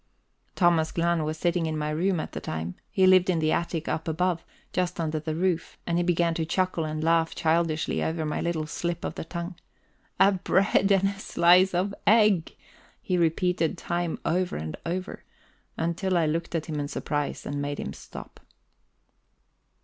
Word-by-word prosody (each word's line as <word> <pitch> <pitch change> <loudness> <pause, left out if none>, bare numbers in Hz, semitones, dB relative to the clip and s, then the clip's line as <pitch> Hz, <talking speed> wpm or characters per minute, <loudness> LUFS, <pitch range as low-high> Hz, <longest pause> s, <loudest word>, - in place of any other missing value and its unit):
Thomas 170 -3 +3
Glahn 170 -1 +1
was 155 +1 -3
sitting 170 0 0
in 155 -1 -2
my 150 0 -2
room 175 +3 +1
at - - -5
the - - -5
time 80 +2 -4 0.2
he 190 - +3
lived 185 0 +6
in 180 - +2
the 155 -1 +1
attic 170 -1 -1
up 160 - -2
above, 170 +1 0 0.3
just 180 -1 -1
under 155 -1 -1
the 155 0 -4
roof 175 -1 -1
and 170 0 0
he - - +2
began 170 -1 +2
to 165 - -1
chuckle 180 0 0
and 155 0 -3
laugh 165 0 +2
childishly 160 -1 +1
over 160 0 -1
my 150 - -2
little 170 -2 -1
slip 170 +2 -3
of - - -3
the - - -5
tongue. 170 +2 -5 0.7
"A 200 - +6
bread 195 +1 +2
and 195 0 +4
a 200 0 -7
slice 180 0 +4
of 190 +3 0
egg!" 210 -6 +4 0.4
he 185 - -1
repeated 170 0 +1
time 175 -1 -2
over 180 +2 0
and 80 0 -5
over, 185 +3 -4 0.5
until 170 +3 0
I 165 - +3
looked 165 +2 -2
at 160 - -1
him 155 -2 -3
in 145 - -2
surprise 145 0 -3
and 145 0 -3
made 145 0 -3
him - - -4
stop. - - -11
170 Hz, 180 wpm, -27 LUFS, 160-180 Hz, 0.7 s, lived